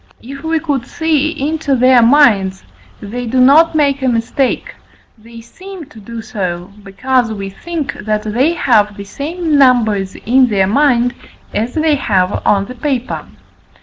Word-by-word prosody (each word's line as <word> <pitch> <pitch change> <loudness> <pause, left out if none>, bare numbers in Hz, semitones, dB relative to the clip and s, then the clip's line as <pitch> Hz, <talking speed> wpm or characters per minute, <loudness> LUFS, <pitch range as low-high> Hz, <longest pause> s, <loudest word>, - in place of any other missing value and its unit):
If 275 +3 -9
we 325 0 0
could 285 -6 -3
see 315 -2 0 0.2
into 310 -3 -1
their 255 0 +5
minds, 230 -7 +3 0.4
they 240 +4 -6
do 255 +3 0
not 310 +6 +5
make 280 -2 +1
a 265 - 0
mistake; 245 +3 -1 0.4
they 230 +1 -14
seem 370 +7 -11
to 220 - -14
do 225 +2 -8
so, 185 -5 -5
because 235 +4 -1
we 195 -2 -6
think, 320 - -5
that 210 0 -3
they 250 +10 +1
have 210 -9 +1
the 200 - -7
same 305 - -2
numbers 220 -8 +2
in 255 +3 +2
their 200 -4 +1
mind 245 +2 +2 0.4
as 225 +4 -2
they 315 -1 +2
have 195 -9 0
on 200 -1 +2
the 250 - -9
paper. 255 -1 -3
245 Hz, 155 wpm, -15 LUFS, 210-285 Hz, 0.4 s, their